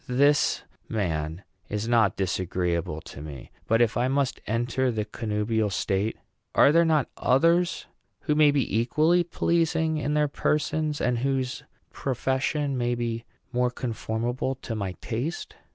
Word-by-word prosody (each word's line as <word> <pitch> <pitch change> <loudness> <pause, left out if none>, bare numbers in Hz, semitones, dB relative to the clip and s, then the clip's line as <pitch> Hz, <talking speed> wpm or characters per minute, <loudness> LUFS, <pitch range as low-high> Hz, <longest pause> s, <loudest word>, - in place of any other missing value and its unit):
This 140 +4 +3 0.3
man 80 -4 -2 0.3
is 105 +2 -2
not 115 -5 +3
disagreeable 90 -3 -1
to 70 - -10
me; 75 -4 -9 0.2
but 115 +1 +4
if 115 - 0
I 120 +1 +2
must 135 0 0
enter 120 +3 0
the 110 -3 -1
connubial 105 0 -1
state, 100 +2 -1 0.4
are 140 - +7
there 165 +2 +5
not 155 -4 +2
others 170 +6 +2 0.4
who 150 - +1
may 150 0 +6
be 135 -6 +1
equally 155 +9 +3
pleasing 160 -1 +1
in 150 0 -1
their 150 0 +3
persons, 150 +1 0
and 120 -1 +1
whose 130 0 -1 0.3
profession 135 +2 -1
may 120 0 +1
be 115 -1 -3 0.3
more 125 0 +2
conformable 120 +1 -2
to 115 - -4
my 100 -4 -3
taste? 130 +9 -4
120 Hz, 140 wpm, -26 LUFS, 110-145 Hz, 0.4 s, are